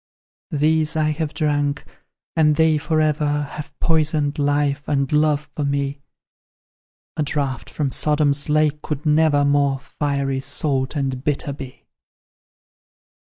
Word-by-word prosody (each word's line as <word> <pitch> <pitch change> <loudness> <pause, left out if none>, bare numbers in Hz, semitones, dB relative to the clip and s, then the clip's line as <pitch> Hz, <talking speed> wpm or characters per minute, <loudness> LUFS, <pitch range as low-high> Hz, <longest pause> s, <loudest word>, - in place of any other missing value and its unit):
"These 155 +1 +1
I 155 -1 +2
have 155 -1 -2
drunk, 145 -2 -1 0.5
and 150 -2 +4
they 160 -1 +3
for 155 +1 0
ever 150 -1 +1
Have 150 - -9
poisoned 155 -2 +1
life 145 0 +1
and 140 -2 0
love 150 0 +1
for 150 - -2
me; 140 0 -1 1.2
A - - +1
draught 140 -5 -2
from 135 +3 -2
Sodom's 150 -1 +1
lake 150 0 +2
could 150 0 -5
never 150 -1 +3
More 140 -1 +2
fiery, 140 -1 -2
salt, 135 0 -1
and 135 -3 -2
bitter, 145 -1 -1
be. 135 -2 -10
145 Hz, 125 wpm, -21 LUFS, 140-155 Hz, 1.2 s, and